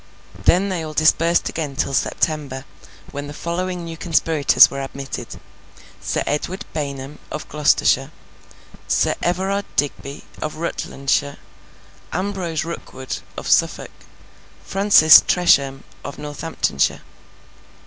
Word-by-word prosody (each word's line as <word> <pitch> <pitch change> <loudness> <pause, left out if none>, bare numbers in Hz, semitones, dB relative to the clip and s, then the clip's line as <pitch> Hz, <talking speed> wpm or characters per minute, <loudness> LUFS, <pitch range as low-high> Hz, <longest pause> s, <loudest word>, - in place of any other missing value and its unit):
Then 190 +3 +4
they 180 -3 -2
all 155 -1 -7
dispersed 165 +2 +3
again 150 -4 -4
till 135 - -1
September, 140 -2 -1 0.5
when 145 0 -6
the 145 - -8
following 180 +2 -3
new 165 -1 -6
conspirators 160 -3 +4
were 140 - -4
admitted; 135 0 -7 0.6
Sir - - -1
Edward 185 +7 -3
Baynham, 140 -1 -5
of 150 - -6
Gloucestershire; 145 -2 +2 0.8
Sir - - +2
Everard 190 +3 -1
Digby, 140 0 -2 0.2
of 155 - -4
Rutlandshire; 140 -3 -2 0.7
Ambrose 185 -4 -2
Rookwood, 130 -5 -6 0.2
of - - -6
Suffolk; - - +2 0.7
Francis 195 -6 +7
Tresham, 140 -6 +3 0.2
of 140 - -7
Northamptonshire. 150 - -1
155 Hz, 105 wpm, -21 LUFS, 140-175 Hz, 0.8 s, Francis